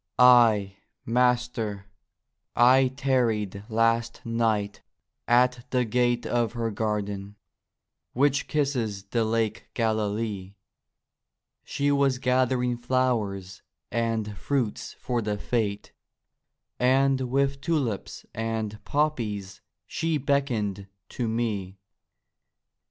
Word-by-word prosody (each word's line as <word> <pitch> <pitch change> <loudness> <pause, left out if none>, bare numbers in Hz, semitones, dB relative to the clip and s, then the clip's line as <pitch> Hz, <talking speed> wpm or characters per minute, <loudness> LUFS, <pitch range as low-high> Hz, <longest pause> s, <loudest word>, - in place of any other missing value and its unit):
Ay, 115 -6 +5 0.3
Master, 120 -4 0 0.7
I 130 +2 +6
tarried 120 -7 0
last 115 +1 +1
night 110 -3 0 0.5
at 125 0 +3
the 125 -1 +1
gate 120 +1 +1
Of 120 -2 0
her 115 -2 -2
garden, 105 -2 -3 0.8
which 140 +2 +2
kisses 125 -9 -1
the 115 +3 -1
Lake 110 -1 -1
Galilee; 105 -3 -1 1.1
She 145 0 0
was 140 -2 +2
gathering 125 -1 +1
flowers 115 -7 -1 0.3
and 115 -2 -1
fruits 125 -1 -2
for 125 -2 -2
the 105 -1 -2
Fete, 105 -2 -2 0.9
And 135 +1 +3
with 140 +1 0
tulips 140 - -2
and 110 -2 -3
poppies 115 -10 -2 0.2
she 165 -1 -1
beckoned 120 -9 -1 0.2
to 120 - -3
me. 105 -4 -2
115 Hz, 90 wpm, -26 LUFS, 105-125 Hz, 1.1 s, I